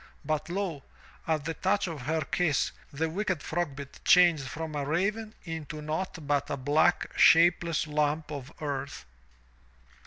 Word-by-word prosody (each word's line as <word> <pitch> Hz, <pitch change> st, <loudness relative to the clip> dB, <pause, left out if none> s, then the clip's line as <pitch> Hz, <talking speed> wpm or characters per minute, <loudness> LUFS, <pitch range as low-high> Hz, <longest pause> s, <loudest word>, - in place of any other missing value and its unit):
But 155 Hz, +1 st, -1 dB
lo! 175 Hz, -5 st, -2 dB, 0.5 s
at 155 Hz, -3 st, 0 dB
the 165 Hz, -, -2 dB
touch 200 Hz, +5 st, +1 dB
of 165 Hz, -6 st, -5 dB
her 160 Hz, +1 st, +1 dB
kiss, 155 Hz, -1 st, +1 dB, 0.2 s
the 160 Hz, +3 st, -1 dB
wicked 185 Hz, -2 st, -2 dB
Frogbit 145 Hz, -5 st, -4 dB
changed 170 Hz, -7 st, +5 dB
from 155 Hz, +4 st, -5 dB
a 145 Hz, -1 st, -2 dB
raven 200 Hz, +9 st, -1 dB
into 160 Hz, -3 st, -6 dB
naught 155 Hz, +1 st, -4 dB
but 145 Hz, 0 st, 0 dB
a -, -, -2 dB
black, 145 Hz, +4 st, +2 dB
shapeless 170 Hz, -1 st, +5 dB
lump 150 Hz, 0 st, -1 dB
of 140 Hz, -1 st, -6 dB
earth. 140 Hz, -, -4 dB
155 Hz, 145 wpm, -29 LUFS, 145-175 Hz, 0.5 s, changed